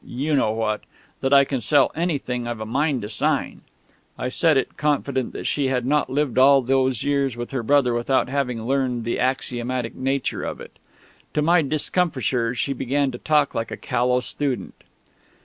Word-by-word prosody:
you 140 Hz, +5 st, -3 dB
know 130 Hz, -6 st, +2 dB
what... 110 Hz, -1 st, -1 dB, 0.4 s
that 135 Hz, -, -1 dB
I 140 Hz, -1 st, +7 dB
can 135 Hz, -2 st, -3 dB
sell 140 Hz, +5 st, +3 dB
anything 140 Hz, -8 st, -2 dB
I've 120 Hz, -2 st, -4 dB
a 110 Hz, -, -4 dB
mind 135 Hz, +1 st, 0 dB
to 105 Hz, -, -5 dB
sign." 110 Hz, -, -1 dB, 0.6 s
I 125 Hz, -, -2 dB
said 155 Hz, +2 st, +3 dB
it, 135 Hz, -, -1 dB
confident 140 Hz, -3 st, -1 dB
that -, -, -6 dB
she 140 Hz, -2 st, 0 dB
had 125 Hz, -2 st, -1 dB
not 145 Hz, +1 st, +1 dB
lived 135 Hz, -2 st, 0 dB
all 135 Hz, 0 st, +6 dB
those 130 Hz, -2 st, +1 dB
years 140 Hz, -4 st, 0 dB
with 120 Hz, 0 st, -5 dB
her 135 Hz, -3 st, -2 dB
brother 125 Hz, 0 st, +3 dB
without 120 Hz, +3 st, +1 dB
having 125 Hz, -4 st, -2 dB
learned 125 Hz, -1 st, 0 dB
the 115 Hz, -, -2 dB
axiomatic 125 Hz, -2 st, -1 dB
nature 135 Hz, 0 st, -2 dB
of -, -, -5 dB
it. -, -, -12 dB, 0.6 s
To 150 Hz, -, +2 dB
my 170 Hz, +2 st, +4 dB
discomfiture, 135 Hz, -5 st, 0 dB
she 135 Hz, +4 st, -1 dB
began 135 Hz, +1 st, 0 dB
to 120 Hz, -, -8 dB
talk 150 Hz, -2 st, +2 dB
like 115 Hz, 0 st, -3 dB
a -, -, -6 dB
callow 125 Hz, +1 st, 0 dB
student. 135 Hz, 0 st, -4 dB
130 Hz, 185 wpm, -23 LUFS, 120-140 Hz, 0.6 s, I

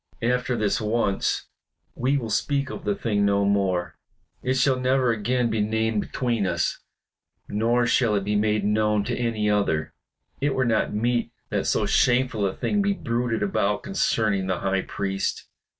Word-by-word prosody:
After 125 Hz, +1 st, +1 dB
this 105 Hz, 0 st, 0 dB
once 105 Hz, -2 st, 0 dB, 0.5 s
we 135 Hz, +3 st, +1 dB
will 115 Hz, -5 st, -4 dB
speak 140 Hz, +3 st, 0 dB
of -, -, -8 dB
the 105 Hz, -1 st, +1 dB
thing 105 Hz, -2 st, 0 dB
no 100 Hz, 0 st, +2 dB
more; 95 Hz, -3 st, 0 dB, 0.4 s
it 130 Hz, +1 st, 0 dB
shall 130 Hz, 0 st, +2 dB
never 130 Hz, -1 st, +2 dB
again 120 Hz, +2 st, 0 dB
be 110 Hz, -1 st, 0 dB
named 110 Hz, 0 st, 0 dB
between 115 Hz, -5 st, -1 dB
us. 85 Hz, -2 st, -1 dB, 0.7 s
Nor 115 Hz, +3 st, +1 dB
shall 120 Hz, -2 st, +2 dB
it 100 Hz, -, 0 dB
be 105 Hz, +1 st, -1 dB
made 105 Hz, 0 st, +1 dB
known 105 Hz, 0 st, +2 dB
to -, -, -2 dB
any 115 Hz, -3 st, -1 dB
other. 100 Hz, -7 st, 0 dB, 0.5 s
It 140 Hz, -1 st, 0 dB
were 130 Hz, -, +1 dB
not 115 Hz, -2 st, +1 dB
meet 115 Hz, +2 st, 0 dB, 0.2 s
that -, -, -1 dB
so -, -, +1 dB
shameful 125 Hz, -4 st, +2 dB
a 95 Hz, -, -3 dB
thing 205 Hz, -, 0 dB
be 200 Hz, 0 st, +2 dB
bruited 115 Hz, -, -1 dB
about 100 Hz, +1 st, 0 dB
concerning 110 Hz, -, 0 dB
the 95 Hz, -2 st, -1 dB
High 95 Hz, -1 st, +1 dB
Priest. 95 Hz, 0 st, -3 dB
110 Hz, 165 wpm, -24 LUFS, 100-125 Hz, 0.7 s, no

